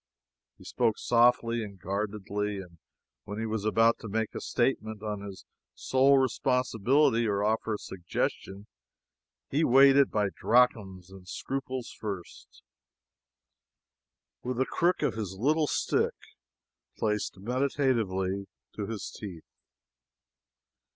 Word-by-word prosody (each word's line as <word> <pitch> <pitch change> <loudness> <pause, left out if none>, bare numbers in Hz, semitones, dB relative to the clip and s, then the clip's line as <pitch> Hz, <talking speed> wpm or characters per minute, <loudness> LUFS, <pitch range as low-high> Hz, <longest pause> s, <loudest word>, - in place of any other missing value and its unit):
He - - -16
spoke 115 -3 0
softly 120 -1 +3
and 100 -2 -9
guardedly; 105 +1 -3
and 90 -3 -10 0.5
when 105 0 -6
he 110 - -2
was 110 -1 -3
about 115 +2 +3
to - - -8
make 110 +1 -2
a - - -5
statement 110 -4 -1
on 105 -2 -3
his 100 -2 -9 0.3
sole 135 +1 +3
responsibility 125 0 +2
or 100 -1 0
offer 110 +1 0
a - - -4
suggestion, 95 +2 -4 0.9
he 150 +4 +2
weighed 135 +1 +6
it 140 - +5
by 105 -2 0
drachms 100 -7 +1
and 95 -1 -13
scruples 130 +3 -4
first, 100 -5 -8 1.8
with 125 -1 -3
the 130 - +2
crook 175 +6 +1
of - - +1
his 105 -4 -5
little 150 +7 +2
stick - - 0 0.8
placed 105 -2 -1
meditatively 110 -5 0 0.3
to 105 -2 -4
his 110 -3 -5
teeth. 90 -7 -8
110 Hz, 120 wpm, -29 LUFS, 100-125 Hz, 1.8 s, weighed